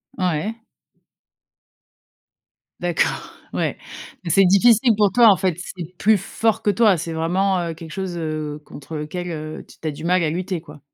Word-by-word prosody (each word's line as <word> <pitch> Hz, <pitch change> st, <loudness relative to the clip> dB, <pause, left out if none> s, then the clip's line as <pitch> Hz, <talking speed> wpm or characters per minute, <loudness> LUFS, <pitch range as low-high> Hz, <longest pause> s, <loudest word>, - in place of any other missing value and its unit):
Ouais. 185 Hz, +4 st, -1 dB, 2.2 s
D'accord, 175 Hz, -1 st, -1 dB, 0.2 s
ouais, -, -, -1 dB, 0.5 s
c'est 195 Hz, +4 st, +5 dB
difficile 225 Hz, +5 st, +5 dB
pour 205 Hz, -2 st, +3 dB
toi 240 Hz, -3 st, +7 dB
en 195 Hz, -, +6 dB
fait, 185 Hz, -4 st, 0 dB, 0.2 s
c'est 175 Hz, 0 st, -8 dB
plus 215 Hz, +1 st, +4 dB
fort 225 Hz, +3 st, -1 dB
que 210 Hz, -, +1 dB
toi, 205 Hz, -1 st, +4 dB
c'est 165 Hz, +1 st, -4 dB
vraiment, 185 Hz, +4 st, +1 dB
heu, -, -, -5 dB
quelque 165 Hz, 0 st, -10 dB
chose, 190 Hz, 0 st, -4 dB
heu, 155 Hz, -2 st, -4 dB
contre 150 Hz, +3 st, -9 dB
lequel, 175 Hz, +4 st, -4 dB
heu, 155 Hz, -1 st, -6 dB
t -, -, -16 dB
tu 160 Hz, -, -4 dB
as -, -, 0 dB
du 145 Hz, -, -10 dB
mal 180 Hz, 0 st, +3 dB
à 155 Hz, -, +1 dB
lutter, 180 Hz, 0 st, -3 dB
quoi. 150 Hz, -3 st, -13 dB
180 Hz, 170 wpm, -21 LUFS, 160-200 Hz, 2.2 s, toi